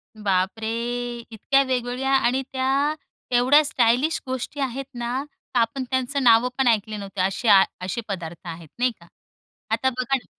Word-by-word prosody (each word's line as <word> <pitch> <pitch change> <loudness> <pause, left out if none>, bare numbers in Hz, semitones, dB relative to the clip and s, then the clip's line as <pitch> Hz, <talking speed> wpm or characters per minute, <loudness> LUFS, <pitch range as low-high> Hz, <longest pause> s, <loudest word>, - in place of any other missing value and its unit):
बापरे! 205 +1 -1 0.6
इतक्या 270 +5 +2
वेगवेगळ्या 255 +1 -1
आणि 265 0 +2
त्या 270 +3 +1 0.4
एवढ्या 280 +5 +5
स्टायलिश 255 +4 +2
गोष्टी 260 +2 -4
आहेत 270 0 -2
ना, 240 +2 -3
तर 285 -3 -5
आपण 230 +3 0
त्यांचं 260 +1 -1
नावं 235 +1 +5
पण 265 -2 +2
ऐकली 215 -1 +1
नव्हती 200 -1 -5
असे 195 +5 0 0.4
असे 235 +6 -3
पदार्थ 175 -3 -6
आहेत. 165 -1 -8
नाही 250 0 +3
का. - - -17 0.6
आता 260 - +2
बघा 255 +1 -1
ना 255 - -5
245 Hz, 150 wpm, -23 LUFS, 220-265 Hz, 0.6 s, एवढ्या